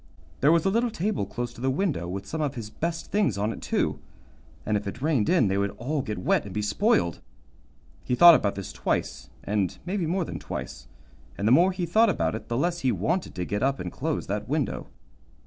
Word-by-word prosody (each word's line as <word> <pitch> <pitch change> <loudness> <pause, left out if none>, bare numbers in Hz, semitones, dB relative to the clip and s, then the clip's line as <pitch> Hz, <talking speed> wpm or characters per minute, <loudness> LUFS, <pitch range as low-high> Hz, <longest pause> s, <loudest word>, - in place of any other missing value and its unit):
There 145 - +5
was 165 0 +3
a 195 - +3
little 235 +3 +2
table 215 -1 -2
close 120 -1 -4
to 120 - -12
the 130 - +1
window, 140 - -1
with 95 +2 -5
some 160 - -4
of 145 -3 -1
his 110 -3 -6
best 165 +6 -4
things 200 - +1
on 105 +3 0
it, - - -10
too, - - -1 0.7
and 105 - +1
if 105 0 -2
it 100 - -5
rained 140 -6 +1
in 135 - +4
they 95 +1 +1
would 100 0 +1
all 140 +5 -1
get 105 -4 -4
wet 90 - +1
and 100 - -9
be 105 +2 -2
spoiled. 105 - +1 0.8
He 125 - 0
thought 175 +4 +10
about 100 -10 +2
this 95 -8 -6
twice, 60 - -2
and 100 -3 -1
maybe 180 -2 -1
more 180 +1 0
than - - -6
twice, - - -7 0.5
and 100 - 0
the - - +4
more 175 +8 +6
he 180 -1 -2
thought 220 +7 +4
about - - 0
it 110 - -6
the 120 - -2
less 175 +4 0
he 130 -4 +1
wanted 175 +3 -1
to 90 - -2
get 105 +3 -2
up 135 0 +1
and 90 -1 -4
close - - -2
that - - -4
window. - - -1
130 Hz, 230 wpm, -26 LUFS, 105-175 Hz, 0.8 s, thought